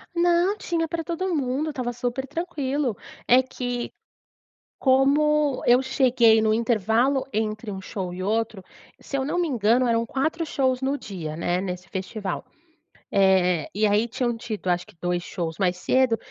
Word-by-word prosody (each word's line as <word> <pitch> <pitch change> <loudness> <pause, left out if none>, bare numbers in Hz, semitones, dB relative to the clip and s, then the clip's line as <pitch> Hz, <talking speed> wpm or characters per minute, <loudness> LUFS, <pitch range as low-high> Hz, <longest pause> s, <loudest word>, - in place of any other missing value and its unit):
Não, 350 +3 +3
tinha 335 -4 -1
pra 330 +1 -3
todo 345 +3 -2
mundo, 275 +2 -1
estava 255 -4 -3
super 245 +2 -3
tranquilo! 285 - -2 0.3
É 250 +2 +7
que, 245 -2 -4 0.9
como 285 +1 +3
eu 245 +1 +6
cheguei 250 -4 +4
no 215 0 +3
intervalo 235 +4 +2
entre 215 0 -2
um 190 - -6
show 190 -2 -5
e 180 +1 -6
outro 220 0 -1 0.4
se 275 - -4
eu 265 - -1
não 300 +5 -1
me 345 - 0
engano 240 -1 +2
eram 230 0 +2
4 315 +7 -1
shows 260 -4 0
no 275 +2 0
dia, 170 - -6
né, 175 +2 -1
nesse 180 -1 -5
festival. 190 0 -4 0.7
Eh, 185 -4 +3
e 215 +2 +2
aí 210 +2 +2
tinham 240 0 -1
tido 220 -4 -5
acho 175 0 0
que - - -19
2 175 0 0
shows 165 -2 -5
mais 180 -2 +1
cedo, 255 +5 +2
240 Hz, 160 wpm, -24 LUFS, 200-275 Hz, 0.9 s, É